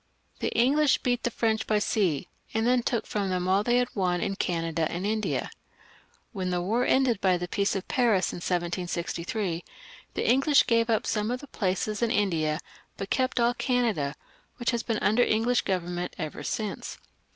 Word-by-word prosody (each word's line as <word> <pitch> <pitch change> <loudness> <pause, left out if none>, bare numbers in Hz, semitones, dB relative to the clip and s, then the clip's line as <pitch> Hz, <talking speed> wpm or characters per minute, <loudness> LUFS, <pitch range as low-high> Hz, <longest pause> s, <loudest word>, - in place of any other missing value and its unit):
The - - 0
English 275 +4 +4
beat 245 -1 +1
the - - 0
French 220 -1 0
by 215 - +3
sea, 190 -8 0 0.3
and 225 0 +1
then 250 0 +3
took 235 -1 -1
from 200 -2 -2
them 180 -1 -1
all 190 +2 +3
they 240 +2 +3
had 250 0 0
won 180 -3 +1
in 195 - -1
Canada 165 -4 -1
and 175 +3 -3
in 210 - +1
India. 220 -1 -1 0.8
When 185 -3 -2
the 180 -1 0
war 220 +8 +1
ended 255 -5 +3
by 185 -2 +3
the 175 0 -4
Peace 200 +3 0
of 195 - -4
Paris 230 -9 +2
in - - -5
1763, 175 +1 -2 0.5
the - - -1
English 275 +3 +5
gave 230 0 +2
up 220 -2 +2
some 210 0 0
of 250 +1 -1
the 285 - -10
places 210 0 -1
in 235 - +2
India, 165 -8 +1 0.4
but 195 - -6
kept 260 -1 +1
all 235 +1 +3
Canada, 230 - 0 0.4
which 240 -1 0
has 235 -1 -1
been 225 -2 -1
under 220 +4 +4
English 235 +1 +2
government 180 -1 -2
ever 155 -4 -5
since. 215 -2 -4
210 Hz, 185 wpm, -27 LUFS, 180-240 Hz, 0.8 s, English